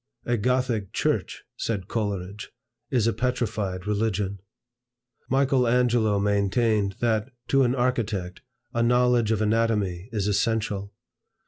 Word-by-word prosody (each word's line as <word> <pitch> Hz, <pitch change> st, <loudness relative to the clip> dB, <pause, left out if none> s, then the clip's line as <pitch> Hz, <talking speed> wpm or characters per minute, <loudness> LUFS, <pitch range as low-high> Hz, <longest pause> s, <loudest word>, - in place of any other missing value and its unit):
"A 120 Hz, -, +1 dB
Gothic 120 Hz, -3 st, 0 dB
church," -, -, -1 dB
said 100 Hz, -5 st, -2 dB
Coleridge, 100 Hz, -2 st, -3 dB, 0.4 s
"is 120 Hz, -4 st, +2 dB
a 115 Hz, -, +2 dB
petrified 105 Hz, -7 st, -2 dB
religion." 105 Hz, -2 st, -1 dB, 0.9 s
Michael 135 Hz, -1 st, +3 dB
Angelo 120 Hz, -3 st, +3 dB
maintained, 100 Hz, 0 st, +1 dB
that, 115 Hz, 0 st, +1 dB, 0.2 s
to 135 Hz, -, +4 dB
an 125 Hz, 0 st, +2 dB
architect, 110 Hz, -8 st, -1 dB, 0.3 s
a 115 Hz, -, +1 dB
knowledge 125 Hz, -1 st, +3 dB
of 110 Hz, -1 st, +1 dB
anatomy 105 Hz, -4 st, 0 dB
is 105 Hz, -4 st, -1 dB
essential. 105 Hz, -1 st, 0 dB
110 Hz, 115 wpm, -25 LUFS, 100-120 Hz, 0.9 s, to